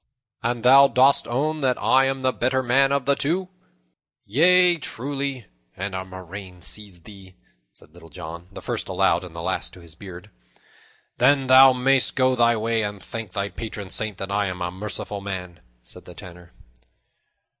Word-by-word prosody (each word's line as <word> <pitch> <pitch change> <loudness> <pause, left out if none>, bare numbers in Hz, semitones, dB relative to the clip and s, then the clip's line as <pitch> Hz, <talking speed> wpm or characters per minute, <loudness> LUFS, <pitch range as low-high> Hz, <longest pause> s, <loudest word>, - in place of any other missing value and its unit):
"And 120 0 -2
thou 135 +2 +7
dost 135 +1 +3
own 150 +6 -2
that 130 -2 0
I 135 0 +3
am 135 0 -3
the 130 0 +1
better 130 +2 0
man 135 +3 +3
of 140 -2 0
the 140 - +3
two?" 180 +7 -1 0.8
"Yea, 175 - +5
truly, 140 -3 -4 0.3
and 95 +1 -4
a 95 0 -4
murrain 95 -1 -10
seize 100 -5 -3
thee!" 95 -1 -15 0.4
said 75 - -20
Little 85 -1 -15
John, 85 0 -9
the - - -11
first - - -4
aloud 85 +2 +1
and 90 -2 -11
the 85 - -7
last - - -3
to - - -14
his 85 -2 -15
beard. 90 +1 -12 0.9
"Then 135 +2 +3
thou 130 0 +7
mayst 130 +1 +2
go 130 -1 +2
thy 120 -1 +3
ways; 115 0 -1
and 105 -1 -5
thank 110 -5 -8
thy 100 0 -3
patron 105 -4 -8
saint 110 -3 -3
that 95 0 -6
I 100 0 0
am 90 -1 -5
a 90 - -3
merciful 100 +1 -6
man," 90 -4 -7 0.2
said - - -14
the - - -13
Tanner. 90 -1 -13
110 Hz, 175 wpm, -23 LUFS, 95-135 Hz, 0.9 s, thou